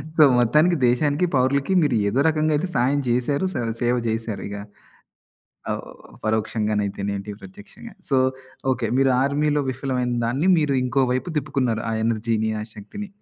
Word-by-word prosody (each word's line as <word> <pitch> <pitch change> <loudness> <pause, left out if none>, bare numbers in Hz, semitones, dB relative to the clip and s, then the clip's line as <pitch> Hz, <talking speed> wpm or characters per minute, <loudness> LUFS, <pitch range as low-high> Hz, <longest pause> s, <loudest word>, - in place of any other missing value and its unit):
So, 160 - +4 0.2
మొత్తానికి 150 +9 +4
దేశానికి, 145 +7 +2
పౌరులకి 135 +6 +2
మీరు 145 -5 +2
ఏదో 110 +6 0
రకంగైయితే 155 +1 +1
సాయం 135 +4 +2
జేశారు, 125 +7 +1
స - - -13 0.3
సేవ 120 +1 +2
జేశారు 110 -1 -3
ఇగ. 100 - -6 1.2
ఆవ్ - - -2 0.4
పరోక్షంగానైతేనేంటి, 105 -2 -1
ప్రత్యక్షంగా 205 +4 -12
సో 135 - +2 0.6
ఓకే, 120 - -2
మీరు 135 0 +4
ఆర్మీలో 145 +1 +1
విఫలమైన 130 -1 -2
దాన్ని 135 +10 0
మీరు 150 -3 +1
ఇంకో 130 +2 +1
వైపు 130 +7 -2
తిప్పుకున్నారు. 130 -6 -1
ఆ - - -2
ఎనర్జీని, 110 -1 0
ఆ - - -3
శక్తిని. 205 - -8
130 Hz, 135 wpm, -23 LUFS, 115-150 Hz, 1.2 s, సో